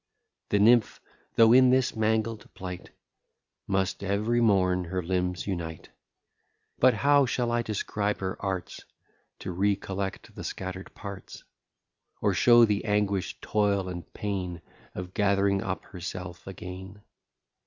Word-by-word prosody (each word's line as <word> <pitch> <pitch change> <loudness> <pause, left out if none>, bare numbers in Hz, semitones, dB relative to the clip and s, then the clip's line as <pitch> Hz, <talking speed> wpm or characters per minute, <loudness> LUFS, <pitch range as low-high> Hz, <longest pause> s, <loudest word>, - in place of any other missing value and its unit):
The 105 - +2
nymph, 115 +2 +4 0.4
though 115 0 +7
in 130 0 +7
this 130 -1 +2
mangled 110 0 -1
plight 90 -1 -7 0.8
Must 95 0 -1
ev'ry 105 +5 +1
morn 90 -5 +3
her 90 +1 -3
limbs 90 0 -1
unite. 85 -5 -5 0.9
But 130 -3 +5
how 140 +4 +4
shall 120 -1 0
I 120 0 +1
describe 105 -1 -2
her 95 -1 -3
arts 95 -2 -3 0.6
To - - -4
re 100 +3 +2
collect 95 0 -5
the - - -8
scatter'd 95 0 -6
parts? 100 -1 -9 0.8
Or - - +1
show 120 -1 +6
the 105 -2 0
anguish, 105 -3 0
toil, 100 -3 +1
and 85 -1 -7
pain, 90 -5 -4 0.3
Of 90 0 -6
gath'ring 100 -2 +2
up 95 -3 -4
herself 90 -1 -7
again? 95 +2 -9
100 Hz, 130 wpm, -27 LUFS, 95-110 Hz, 0.9 s, though